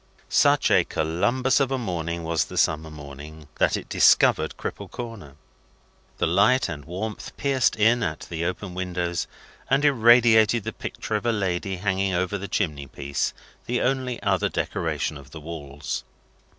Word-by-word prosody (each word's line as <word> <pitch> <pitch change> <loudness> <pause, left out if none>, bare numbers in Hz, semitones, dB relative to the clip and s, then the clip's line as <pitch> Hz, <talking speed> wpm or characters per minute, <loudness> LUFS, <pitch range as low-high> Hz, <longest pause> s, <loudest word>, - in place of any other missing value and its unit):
Such - - +4
a - - +5
Columbus 100 - +1
of 135 -2 +2
a 135 - 0
morning 85 -7 -3
was 80 -1 0
the - - -9
summer 80 0 +1
morning, 75 +1 -10
that - - +3
it - - -8
discovered - - +4
Cripple - - -6
Corner. 115 - -8 0.8
The - - +1
light 105 +10 +3
and 75 -5 -7
warmth 100 +6 -6
pierced 135 -3 +2
in 115 +3 +3
at 80 -7 -2
the 85 -1 -5
open 90 +2 -3
windows, 90 -1 -2 0.4
and 140 +2 +3
irradiated 120 -3 +5
the - - -4
picture - - -6
of 105 - -2
a - - +4
lady 95 -3 -1
hanging 95 0 0
over 90 +3 -1
the 100 - -5
chimney 75 -8 -2
piece, 70 +2 -2 0.4
the 120 +1 0
only 130 -2 -1
other 95 -4 +1
decoration 75 - -2
of 70 -1 -13
the 80 - -9
walls. 75 -2 -6
95 Hz, 160 wpm, -25 LUFS, 80-115 Hz, 0.8 s, a